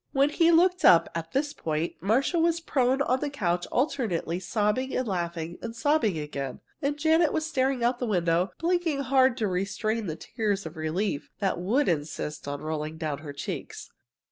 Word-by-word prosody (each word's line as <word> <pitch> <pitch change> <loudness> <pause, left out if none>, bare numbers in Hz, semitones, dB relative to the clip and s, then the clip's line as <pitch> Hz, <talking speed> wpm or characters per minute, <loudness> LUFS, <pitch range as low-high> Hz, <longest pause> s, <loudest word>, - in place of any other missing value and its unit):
When 280 +2 +3
he 330 +2 +4
looked 360 +2 +4
up, 170 - +7
at 165 0 -5
this 285 +2 0
point, 155 +1 -2
Marcia 255 - +2
was 335 0 +2
prone 270 -4 +1
on 255 0 +1
the 290 - -2
couch 180 -10 -1
alternately 230 - 0
sobbing 210 +7 0
and 255 - -1
laughing 170 -3 -3
and 230 -1 -6
sobbing 235 - +2
again, 140 -3 -5 0.2
and 285 0 -1
Janet 320 +1 +3
was 315 - -1
staring 265 -5 0
out 240 +1 +2
of - - -26
the 245 - -2
window, 175 -2 +1
blinking 335 -4 0
hard 260 -1 +3
to 220 -4 0
restrain 200 +4 -1
the 160 - -3
tears 205 +1 -2
of 160 - -7
relief 155 0 -2
that 195 -4 -1
would 235 +11 +1
insist 150 -2 -2
on 145 0 -4
rolling 155 0 -3
down 155 -3 -3
her 145 -1 -7
cheeks. 140 - -6
215 Hz, 185 wpm, -27 LUFS, 165-275 Hz, 0.2 s, up